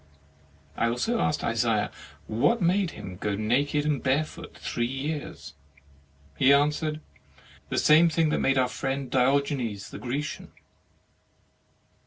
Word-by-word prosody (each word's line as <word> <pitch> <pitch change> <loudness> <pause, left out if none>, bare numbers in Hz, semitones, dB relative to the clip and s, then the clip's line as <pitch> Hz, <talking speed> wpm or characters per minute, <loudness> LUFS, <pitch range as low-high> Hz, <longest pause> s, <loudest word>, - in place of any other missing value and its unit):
I 115 - +1
also 225 - -1
asked 150 - 0
Isaiah 115 -2 +1 0.3
what 120 - +1
made 185 0 +2
him 95 - -9
go 105 +1 -2
naked 140 +8 0
and 150 -2 0
barefoot 150 +4 -2
three 120 0 -2
years. 145 +4 -5 0.8
He 135 - +4
answered: 150 +2 +2 0.7
"The - - -2
same 155 +3 +6
that 160 -1 +1
made 135 0 +2
our 130 -1 +3
friend 135 0 -3
Diogenes 130 -5 0
the - - -8
Grecian." 140 +5 -4
140 Hz, 120 wpm, -26 LUFS, 120-150 Hz, 0.8 s, same